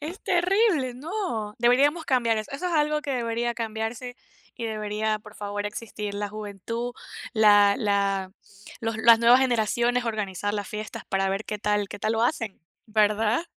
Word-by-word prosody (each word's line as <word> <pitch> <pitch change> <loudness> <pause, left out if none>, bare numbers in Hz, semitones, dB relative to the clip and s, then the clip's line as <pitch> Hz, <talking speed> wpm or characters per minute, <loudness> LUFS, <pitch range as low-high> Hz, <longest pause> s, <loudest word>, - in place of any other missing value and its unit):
Es 320 +6 -6
terrible, 360 - +2
no. 255 - -4
Deberíamos 275 +7 +3
cambiar 235 -4 +2
eso. 215 - -6
Eso 280 +6 -3
es - - -3
algo 300 0 +1
que 285 - -4
debería 235 -1 -1
cambiarse 230 +2 -4 0.4
y 235 - -5
debería, 215 0 -2
por 215 0 -14
favor, 205 0 -4
existir 210 -1 -6
la 205 0 -3
juventud, 215 +3 -5 0.4
la 205 -2 +6
la 200 -2 0 0.5
los 225 -2 -2
las 230 0 +7
nuevas 240 +2 +6
generaciones 240 0 +1
organizar 205 -2 -2
las 205 -1 -3
fiestas 215 0 -6
para 195 0 +1
ver 195 +2 -2
qué 210 - -4
tal 210 0 0
qué 205 - -8
tal 215 +2 0
lo 225 - +1
hacen, 230 -6 -1 0.3
¿verdad? 215 +5 +2
225 Hz, 165 wpm, -25 LUFS, 210-245 Hz, 0.5 s, las